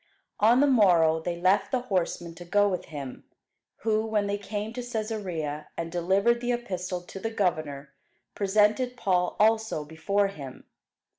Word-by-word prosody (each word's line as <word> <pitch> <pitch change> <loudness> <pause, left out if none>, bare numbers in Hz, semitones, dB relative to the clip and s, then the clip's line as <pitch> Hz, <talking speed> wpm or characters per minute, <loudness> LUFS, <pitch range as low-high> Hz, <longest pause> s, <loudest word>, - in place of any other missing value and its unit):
On 235 +5 +5
the - - +6
morrow 175 - +4
they 170 +1 -4
left 195 +2 +3
the 255 - +1
horsemen 175 -6 -2
to 170 +1 -10
go 205 +4 +3
with 185 -3 -2
him, 140 -4 -8 0.6
who, 215 -1 +1
when 215 -2 0
they 200 0 -2
came 205 +2 -4
to 250 - -4
Cæsarea, 200 -11 -4
and 165 0 -4
delivered 195 +7 +2
the 245 0 0
epistle 185 -6 -3
to 180 +2 -9
the 225 - -2
governor, 155 -9 -2 0.4
presented 210 +5 +2
Paul 180 -5 +1
also 220 -7 +2
before 195 +6 0
him. 140 -9 -9
195 Hz, 155 wpm, -27 LUFS, 170-220 Hz, 0.6 s, the